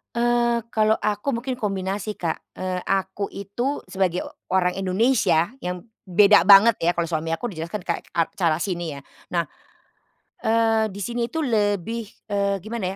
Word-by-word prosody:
Eee, 235 0 +2
kalau 215 -1 +3
aku 210 +6 -1
mungkin 250 +2 -3
kombinasi 200 -1 -2
Kak, 170 -5 -5
eee, 185 -1 -4
aku 195 +1 -1
itu 240 +8 -3
sebagai 185 -2 0 0.3
orang 180 -1 +2
Indonesia 195 -2 +2
yang 180 -6 -5 0.2
beda 200 0 +5
banget 205 +3 +8
ya 170 +1 +1
kalau 170 -1 -2
suami 165 0 -1
aku 205 +9 -2
dijelaskan 170 +2 -5
kayak - - -3
a 165 -1 +2
cara 165 -4 +2
sini 175 -5 -2
ya - - -16 0.3
nah, 170 -3 0 1.0
eee, 225 -1 +2
di 200 - -8
sini 235 +4 -2
itu 320 - -1
lebih, 220 - 0 0.2
eee, 200 -1 0
gimana 215 -2 -4
200 Hz, 155 wpm, -23 LUFS, 180-225 Hz, 1.0 s, banget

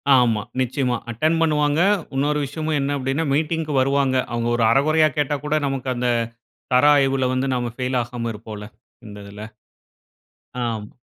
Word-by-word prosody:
ஆமா. 115 -4 +3 0.2
நிச்சயமா 125 -1 0
அட்டெண்ட் 155 +8 +1
பண்ணுவாங்க. 150 -1 +2 0.4
இன்னொரு 145 +2 +1
விஷயமும் 155 +2 -2
என்ன 140 +2 -1
மீட்டிங்‌க்கு 155 +1 -1
வருவாங்க. 135 0 +1 0.2
அவங்க 120 0 -1
ஒரு 120 - +1
அரைகொறையா 155 +4 +3
கேட்டா 145 0 0
கூட 150 +1 0
நமக்கு 135 -1 -3
அந்த 125 0 0 0.6
தர 125 +3 +5
ஆய்வுல 135 -2 +2
வந்து 130 +1 0
நாம 120 -1 -2
ஃபெயில் 130 0 -1
ஆகாம 120 -1 -5
இருப்போம்ல. 105 -1 -9 0.4
இந்ததுல. 100 0 -10 1.2
ஆமா. 110 -3 -3
135 Hz, 135 wpm, -22 LUFS, 120-150 Hz, 1.2 s, தர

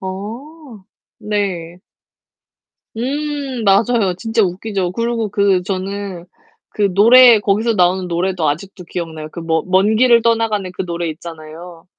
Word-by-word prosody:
어. 225 +6 -8 0.3
네. 185 -5 -3 1.2
음 275 -1 -3
맞아요. 200 -1 +2
진짜 225 +3 0
웃기죠. 190 0 -2
그리고 230 +1 -2
그 195 -2 +1
저는 190 -1 -5 0.5
그 200 -2 0
노래 235 +3 +7
거기서 210 +3 0
나오는 180 -1 +1
노래도 175 -1 -1
아직도 180 +5 -5
기억나요. 160 -3 -6
그 170 - -8
머 160 -1 0
먼 190 +4 +2
길을 235 -1 +4
떠나가는 225 -4 0
그 190 - -4
노래 170 -1 -3
있잖아요. 165 +1 -10
195 Hz, 260 characters per minute, -17 LUFS, 175-225 Hz, 1.2 s, 노래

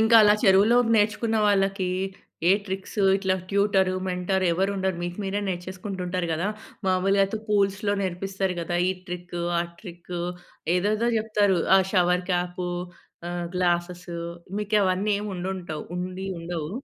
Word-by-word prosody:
ఇంకా 220 +1 +4
అలా 210 0 +6
చెరువులో 200 +3 +6 0.2
నేర్చుకున్న 220 +1 +2
వాళ్ళకీ 195 -2 +2 0.6
ఏ - - +7
ట్రిక్స్ 190 +2 -5 0.2
ఇట్లా 190 -1 +1 0.2
ట్యూటరు, 195 -2 +2
మెంటర్ 185 +1 0
ఎవ్వరుండరు. 190 0 0
మీకు 175 +2 -4
మీరే 200 +2 -1
నేర్చేసుకుంటూ 185 +2 -5
ఉంటారు 180 -1 -1
గదా! 170 +6 -1 0.4
మామూలుగా 195 +2 +3
అయితే 195 +3 -3
పూల్స్‌లో 200 0 +2
నేర్పిస్తారు 190 0 -2
కదా! 175 +1 -2
ఈ - - +3 0.2
ట్రిక్ 175 0 -6 0.2
ఆ - - +3 0.2
ట్రిక్ 175 -3 -9 0.6
ఏదేదో 215 +5 +1
జెప్తారు. 210 -4 +2 0.2
ఆ - - +7
షవర్ 180 -1 +3
క్యాపూ, 180 0 -1 0.6
ఆహ్, 175 -1 -3
గ్లాసెస్‌సూ 175 -1 -1 0.4
మీకవన్నీ 205 -1 +1
ఏముండుండవు 185 -5 -4
ఉండి 185 +1 -4
ఉండవు. 165 -2 -4
190 Hz, 130 wpm, -25 LUFS, 180-200 Hz, 0.6 s, ఏ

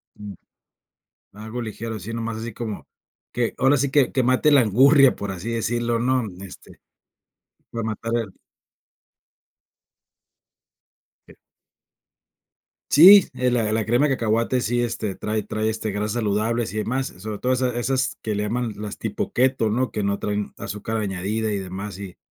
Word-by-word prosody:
Mm. 105 -1 -9 1.0
Algo 110 +4 -6
ligero, 110 +1 -5
así 100 +2 -9
nada 115 0 -4
más, 115 -1 -4
así 115 +1 -6
como 110 -1 -6 0.5
que, 120 -2 -1
ahora 135 +3 +4
sí 140 0 0
que 140 -4 +4
que, 130 - +1
mate 130 +4 +3
la 140 -3 +6
angurria, 135 +5 +5
por 100 -1 -5
así 95 +4 -5
decirlo, 115 +1 -1
¿no?, 130 0 +1 0.2
este, 95 - -13 0.9
para 115 -1 -4
matar 115 +1 -4
el. 110 -5 -3 2.9
Eh. - - -16 1.6
Sí, 190 +6 +9
eh, 125 0 0
la 115 -3 0
la 110 -1 0
crema 120 +6 +3
de 135 - +1
cacahuate 115 +2 0
sí, 120 +2 0
este, 115 -4 -3
trae 110 0 -2
trae, 110 +1 -2
este, 110 -1 -3
grasas 105 +1 -2
saludables 115 0 -1
y - - -4
demás, 130 +5 -1
sobre 105 +2 -6
todo 130 +1 +1
esa 125 -1 -1
esas 130 +2 -1
que 110 -2 -2
le 105 - -1
llaman 115 +1 -2
las 105 -1 -6
tipo - - -3
keto, 125 -3 +2
¿no? 125 +4 0
Que 105 - -3
no 100 0 -1
traen 105 0 -3
azúcar 110 +2 -4
añadida 105 +2 -2
y 100 - -1
demás, 95 +1 -6
y 95 -3 -9
115 Hz, 160 wpm, -23 LUFS, 105-125 Hz, 2.9 s, Sí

